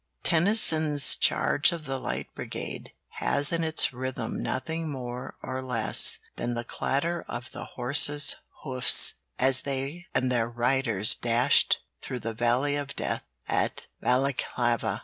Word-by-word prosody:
Tennyson's 160 - +4
'Charge 150 - +2
of 165 -3 -6
the 135 -1 -4
Light - - -5
Brigade' - - -7 0.3
has 145 +1 +2
in 165 -1 -1
its 160 -4 +3
rhythm 130 +1 -5
nothing 160 +4 -3
more 125 -2 -7
or 130 0 -4
less 125 -4 +4 0.2
than 120 0 -3
the 120 - -3
clatter 160 +8 -2
of 120 +1 -7
the - - -8
horses' 145 +3 +3 0.3
hoofs 130 -3 +4 0.2
as 130 +1 +4
they 140 +5 -5
and 130 0 +1
their 115 -2 0
riders 120 -3 +1
dashed 120 +1 +3 0.2
through 125 -2 -6
the 115 - -4
valley 120 +5 0
of 145 -1 -5
death - - -3 0.3
at - - -1 0.2
Balaklava. 120 -4 0
130 Hz, 135 wpm, -26 LUFS, 120-145 Hz, 0.3 s, Tennyson's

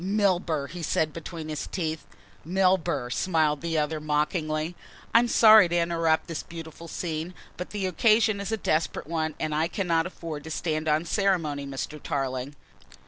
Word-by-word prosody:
"Milburgh!" 180 -7 +1
he 175 0 -7
said 155 -1 0
between 165 -1 -7
his 155 -1 -4
teeth. 160 -4 -3 0.4
"Milburgh!" 175 -7 +1
smiled 155 -5 +1
the 165 -1 -1
other 155 +1 0
mockingly. 155 +2 -1 0.4
"I 230 - +8
am 240 - +2
sorry 215 -5 +7
to 175 - +1
interrupt 165 -1 +1
this 165 -3 -4
beautiful 165 0 -9
scene, 165 +1 -4 0.2
but 180 - -6
the 205 -2 -3
occasion 215 +3 +3
is 200 - -4
a 220 - 0
desperate 155 -5 -1
one 160 -1 -2
and 155 -1 -2
I 155 +2 +1
cannot 170 -3 0
afford 165 -5 -7
to - - -7
stand 155 0 -2
on 155 +2 +2
ceremony, 165 -7 0
Mr. 140 +2 -5
Tarling." 135 0 -3
165 Hz, 165 wpm, -27 LUFS, 155-180 Hz, 0.4 s, I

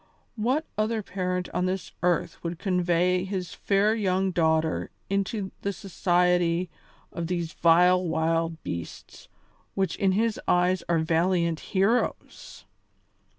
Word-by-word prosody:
What 255 +8 0
other 215 0 0
parent 180 -1 -2
on 180 - 0
this 185 -2 -3
earth 175 -1 0
would 170 0 -3
convey 180 -1 +1
his 185 -2 -4
fair 205 +2 +2
young 190 -3 0
daughter 160 -2 +1 0.2
into 200 0 -1
the 200 - -1
society 180 -2 +1 0.4
of 170 -1 -4
these 170 -2 -3
vile 180 +2 +4
wild 165 0 -1
beasts, 85 -1 -7 0.5
which 190 -1 0
in 190 -1 +2
his 220 +2 0
eyes 180 +1 +3
are 170 - +3
valiant 170 +1 +1
heroes? 210 +6 -1
180 Hz, 120 wpm, -26 LUFS, 170-195 Hz, 0.5 s, vile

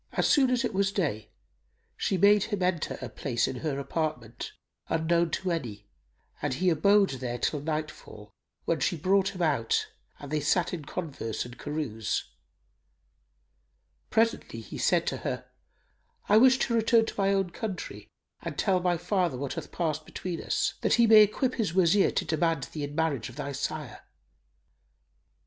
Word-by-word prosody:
As - - +1
soon 270 -3 +4
as 250 0 +1
it - - -3
was 195 0 +1
day, 145 - -2 0.7
she 190 - 0
made 200 +2 +5
him 205 -4 -2
enter 180 -3 -1
a - - -3
place 120 -4 -1
in 130 - -4
her 145 0 -2
apartment 135 -5 -3 0.4
unknown 170 +1 +2
to 185 +3 -2
any 115 -11 -4 0.6
and 130 - -1
he 180 +6 +2
abode 200 +5 +4
there 120 -1 -3
till 145 +5 -1
nightfall, 150 -9 -5 0.3
when 165 - 0
she 165 +6 0
brought 195 +4 +2
him 180 - -2
out 140 -8 +1 0.3
and 145 0 -10
they 155 - +1
sat 170 +5 +1
in 160 -5 -5
converse 140 -11 -4
and 120 +1 -11
carouse. 145 -8 -2 1.9
Presently 225 - 0
he 110 - -8
said - - +2
to - - -1
her, - - -4 0.8
"I 205 - +4
wish 260 +3 +6
to 240 - -2
return 225 0 +4
to - - -6
my 195 0 +3
own 195 -2 +1
country 195 -1 -6 0.3
and - - -6
tell 190 -3 +2
my 175 -1 +1
father 175 -5 0
what 140 +1 -3
hath - - -7
passed 155 -2 -2
between 175 -3 -5
us, - - 0
that - - +3
he 235 - +5
may 220 -1 +8
equip 245 +5 +2
his 205 -7 -2
Wazir 190 +2 +4
to 185 - -1
demand 165 -2 0
thee 150 - -4
in 145 +1 -8
marriage 150 -7 0
of 120 - -12
thy 140 -1 -4
sire." 145 -1 -4
165 Hz, 170 wpm, -28 LUFS, 140-195 Hz, 1.9 s, may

